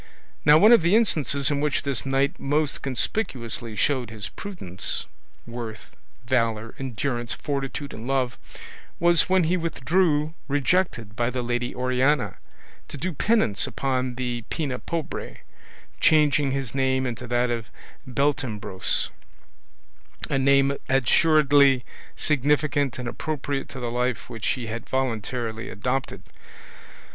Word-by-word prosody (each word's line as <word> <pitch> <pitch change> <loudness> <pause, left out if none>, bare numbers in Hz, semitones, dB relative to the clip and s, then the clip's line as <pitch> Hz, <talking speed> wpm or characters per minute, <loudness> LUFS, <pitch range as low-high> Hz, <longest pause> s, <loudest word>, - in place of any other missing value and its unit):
Now 150 +1 +8
one 210 +7 +7
of 235 - +8
the 170 +5 +3
instances 150 - +2
in 145 -1 0
which 150 0 0
this 135 -3 -1
knight 135 +1 +1
most 145 +1 0
conspicuously 120 - -2
showed 130 -1 +1
his 105 -3 -6
prudence, 135 - -4 0.4
worth, 115 -2 -8 0.3
valour, 115 -2 0
endurance, 120 -2 -2
fortitude, 140 0 -4
and 115 +2 -7
love, 130 -2 0 0.6
was 170 0 +4
when 185 -1 +4
he 175 +3 +2
withdrew, 160 -1 +1
rejected 140 - 0
by 120 +1 0
the 125 0 -3
Lady 120 0 -2
Oriana, 130 +3 +1 0.5
to - - -7
do 175 +6 -3
penance 150 - +1
upon 130 -2 -1
the 120 -2 -3
Pena 140 -6 -2
Pobre, 165 -3 -5 0.6
changing 145 -3 +4
his 135 -4 -3
name 130 -1 +1
into 125 0 -4
that 120 0 +1
of 115 -3 -3 0.4
Beltenebros, 125 -8 0 1.2
a 135 - +2
name 140 +1 +4
assuredly 140 0 +4 0.3
significant 145 -2 +1
and 125 -2 -5
appropriate 145 -1 -3
to 135 - -8
the 120 -1 -3
life 125 0 -2
which 115 -2 -4
he 125 - -5
had 115 0 -6
voluntarily 115 -3 -2
adopted. 125 +7 -3
135 Hz, 125 wpm, -25 LUFS, 120-145 Hz, 1.2 s, Now